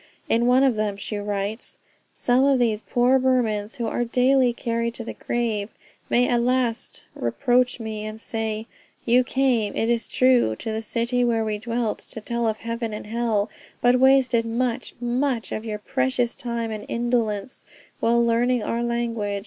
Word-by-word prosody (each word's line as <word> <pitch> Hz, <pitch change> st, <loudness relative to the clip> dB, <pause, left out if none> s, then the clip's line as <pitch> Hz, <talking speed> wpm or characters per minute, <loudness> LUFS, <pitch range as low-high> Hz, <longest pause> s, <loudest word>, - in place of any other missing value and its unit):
In 235 Hz, +1 st, +2 dB
one 255 Hz, +2 st, +5 dB
of 265 Hz, -4 st, +3 dB
them 210 Hz, -2 st, -1 dB
she 205 Hz, +1 st, -4 dB
writes: 205 Hz, +2 st, -4 dB, 0.3 s
"Some 250 Hz, +2 st, +2 dB
of 275 Hz, -1 st, +4 dB
these 225 Hz, -3 st, +1 dB
poor 250 Hz, +3 st, +3 dB
Burmans, 235 Hz, -4 st, +1 dB
who 240 Hz, -4 st, -3 dB
are 235 Hz, +2 st, -1 dB
daily 250 Hz, +1 st, +3 dB
carried 235 Hz, 0 st, -2 dB
to 235 Hz, -, -3 dB
the -, -, -6 dB
grave, 225 Hz, -4 st, -2 dB, 0.4 s
may 245 Hz, +1 st, +3 dB
at 240 Hz, -1 st, +2 dB
last 245 Hz, -1 st, -1 dB
reproach 250 Hz, -2 st, +1 dB
me 220 Hz, -2 st, -5 dB
and 215 Hz, 0 st, -6 dB
say, 220 Hz, -1 st, -3 dB, 0.4 s
you 245 Hz, +2 st, +4 dB
came, 250 Hz, -5 st, +1 dB
it 225 Hz, +1 st, +1 dB
is 235 Hz, -1 st, 0 dB
true, 255 Hz, -, +3 dB
to 220 Hz, -, -5 dB
the 220 Hz, 0 st, -2 dB
city 235 Hz, +3 st, 0 dB
where 230 Hz, -2 st, +1 dB
we 210 Hz, -1 st, -2 dB
dwelt, 230 Hz, 0 st, -2 dB
to -, -, -9 dB
tell 235 Hz, +1 st, -2 dB
of 220 Hz, -1 st, 0 dB
heaven 230 Hz, -1 st, -4 dB
and 210 Hz, -, -6 dB
hell, 220 Hz, -1 st, -1 dB, 0.3 s
but 245 Hz, +1 st, +4 dB
wasted 265 Hz, -3 st, +4 dB
much, 235 Hz, +2 st, -2 dB
much 245 Hz, 0 st, -1 dB
of 215 Hz, -, -4 dB
your 215 Hz, -2 st, -3 dB
precious 255 Hz, +1 st, 0 dB
time 235 Hz, -2 st, -3 dB
in 215 Hz, -1 st, -4 dB
indolence 235 Hz, -2 st, -1 dB, 0.4 s
while 235 Hz, +1 st, +3 dB
learning 235 Hz, 0 st, +2 dB
our 235 Hz, -, -1 dB
language. 230 Hz, -4 st, -1 dB
235 Hz, 175 wpm, -24 LUFS, 220-245 Hz, 0.4 s, one